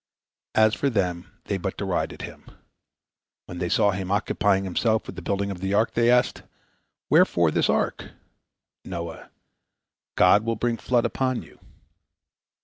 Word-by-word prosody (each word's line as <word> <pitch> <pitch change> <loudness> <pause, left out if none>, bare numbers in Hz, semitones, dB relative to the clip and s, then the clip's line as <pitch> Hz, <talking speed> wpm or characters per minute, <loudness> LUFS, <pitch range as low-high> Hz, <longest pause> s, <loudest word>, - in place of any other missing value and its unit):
As 110 0 +5
for 140 - 0
them, 90 -6 -2
they 100 - -3
but 95 +1 -4
derided 95 -4 -2
him. - - -10 1.0
When 90 - -8
they 90 -1 -2
saw 105 +3 +3
him 95 -1 -4
occupying 100 -1 +1
himself 110 +4 0
with - - -8
the 90 - -7
building 100 +2 -2
of 95 - -7
the 95 +2 -1
ark, 110 +2 +2
they 115 0 +3
asked, 125 0 +2 0.7
"Wherefore 85 -2 +4
this - - +1
ark?" - - -1 0.7
Noah: 85 -2 -7 0.9
"God 100 +4 +5
will 115 0 -1
bring 115 +1 -1
a - - -16
flood 120 -2 +1
upon 130 -2 -1
you." - - -18
100 Hz, 150 wpm, -25 LUFS, 90-115 Hz, 1.0 s, As